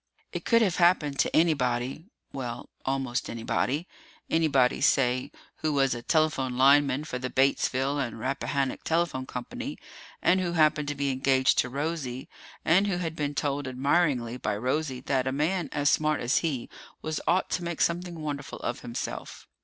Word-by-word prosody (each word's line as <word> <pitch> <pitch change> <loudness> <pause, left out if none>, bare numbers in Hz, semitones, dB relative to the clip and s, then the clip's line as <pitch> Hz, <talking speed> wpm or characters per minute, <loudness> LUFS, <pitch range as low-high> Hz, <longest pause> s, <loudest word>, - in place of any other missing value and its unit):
It - - -5
could 230 -1 +4
have 185 -5 +1
happened 170 -5 +3
to - - +1
anybody 135 -1 +1 0.3
well, 125 -3 -5 0.2
almost 135 -2 -1
anybody. 130 +7 -1 0.4
Anybody, 140 -6 +3
say, 125 -1 +2 0.3
who 155 -1 -1
was 135 -2 +3
a 120 - -5
telephone 135 -3 +1
lineman 140 +1 +5
for 125 -5 -5
the 130 0 -3
Batesville 135 +1 +1
and 120 -4 -3
Rappahannock 135 +1 -2
Telephone 160 -6 0
Company, 250 - -6 0.4
and 185 +1 +3
who 175 -2 -1
happened 155 -2 +3
to 145 - -2
be 140 -1 0
engaged 130 0 +3
to 125 - +1
Rosie, 140 -2 -3 0.4
and 190 +5 +4
who 190 -3 0
had 165 -3 -3
been 145 -2 -2
told 140 -1 -1
admiringly 130 -2 +1
by 105 -4 -2
Rosie 130 +2 -1
that 135 -1 0
a - - +1
man 155 +3 0
as 145 -1 +2
smart 155 0 +2
as 120 +2 +2
he 140 -8 -2 0.4
was 155 -1 -2
ought 175 +4 +2
to 180 - -1
make 170 -2 -4
something 175 0 0
wonderful 145 -2 -5
of 120 - -3
himself. 120 0 -6
140 Hz, 165 wpm, -27 LUFS, 130-160 Hz, 0.4 s, lineman